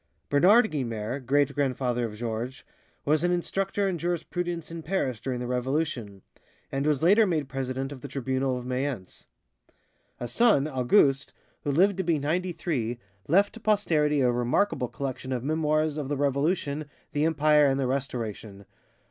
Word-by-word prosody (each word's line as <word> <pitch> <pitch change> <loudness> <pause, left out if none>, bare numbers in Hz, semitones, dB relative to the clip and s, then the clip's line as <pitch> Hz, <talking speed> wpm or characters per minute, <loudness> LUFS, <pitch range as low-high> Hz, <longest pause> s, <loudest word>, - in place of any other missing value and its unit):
Bernard 205 +11 +5
Guynemer, 120 -3 -3
great 140 +2 +1
grandfather 130 -4 0
of 110 -2 -6
Georges, 115 +3 -4 0.4
was 155 +2 +2
an 175 - +3
instructor 195 +3 -1
in 180 -3 -2
jurisprudence 175 0 -3
in 165 0 -6
Paris 150 - -1
during 125 0 -3
the 125 - -3
Revolution, 125 - -2 0.5
and 140 +2 -1
was 150 -1 +1
later 205 +5 +5
made 155 -6 0
president 135 0 -3
of 135 -3 -9
the 140 - -6
Tribunal 130 -1 -1
of 125 - -7
Mayence. 125 -6 -4 0.9
A 120 - -4
son, 150 - +3
Auguste, 135 +1 +2 0.3
who - - -2
lived 185 +7 +3
to 190 - 0
be 165 -2 +2
ninety 170 +6 -1
three, 125 -9 -2 0.3
left 200 +7 +3
to 230 - -10
posterity 160 -10 +2
a 125 -1 +3
remarkable 125 +4 +1
collection 130 0 -5
of 125 -2 -2
memoirs 155 0 +1
of 145 -3 -3
the 145 - -1
Revolution, 145 +2 0 0.3
the 145 0 0
Empire, 150 -2 +4
and 135 0 +1
the 135 - +1
Restoration. 115 -6 -4
140 Hz, 160 wpm, -27 LUFS, 125-165 Hz, 0.9 s, Bernard